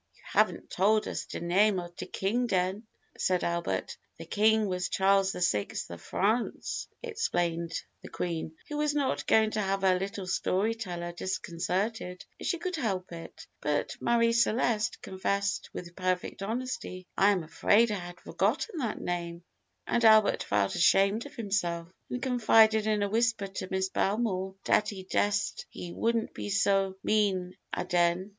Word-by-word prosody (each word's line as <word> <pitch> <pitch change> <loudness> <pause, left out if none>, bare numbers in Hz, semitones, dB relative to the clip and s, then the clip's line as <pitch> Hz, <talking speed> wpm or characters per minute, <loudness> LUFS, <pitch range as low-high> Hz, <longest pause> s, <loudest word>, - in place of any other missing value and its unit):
"You - - -24
haven't - - +1
tol' 210 +3 +2
us - - -4
de - - -5
name 190 +4 +3
of 175 0 -8
de - - -6
king 235 +6 0
den," 190 +2 0 0.3
said 180 -1 +1
Albert. 170 0 -2 0.2
"The - - -8
king 220 +1 +3
was 180 -2 -2
Charles 195 0 +3
the 180 - -2
Sixth 105 - -1
of 85 - -8
France," 220 +5 -1 0.2
explained 175 - -1 0.2
the - - -10
Queen, 165 -2 -3
who 295 - -4
was 300 0 +1
not 275 -3 0
going 220 -1 +4
to 215 - -1
have 195 0 -1
her 185 -1 +4
little 195 0 -4
story 190 +3 +1
teller 175 -6 -5
disconcerted 180 +2 -3
if - - -4
she 345 - +1
could 365 +1 -3
help 195 - -2
it; 165 -1 -9 0.2
but 150 0 -1
Marie 230 -1 +3
Celeste 230 -1 +1
confessed 200 +2 -1
with 175 0 -8
perfect 185 0 -2
honesty, 220 -4 -4
"I 195 +1 +5
am 190 -4 +1
afraid 215 +8 +3
I 205 - -1
had 175 0 -9
forgotten 315 - -1
that 235 -6 -2
name;" 170 -1 -4 0.4
and 235 - 0
Albert 220 -1 +6
felt 100 -1 +1
ashamed 195 +6 +3
of - - -15
himself, 175 -6 -1 0.2
and 250 - -3
confided 220 -4 +4
in 210 -1 +2
a - - +1
whisper 225 0 +1
to 195 -1 -6
Miss 190 0 0
Belmore 195 -2 0
"dat 210 - +3
he 195 -4 -7
dessed 205 +2 0
he 170 -1 -8
wouldn't 230 0 0
be - - -5
so 195 -1 +2
mean 190 -4 +1 0.2
aden." 175 +2 +1
195 Hz, 165 wpm, -29 LUFS, 180-220 Hz, 0.4 s, Albert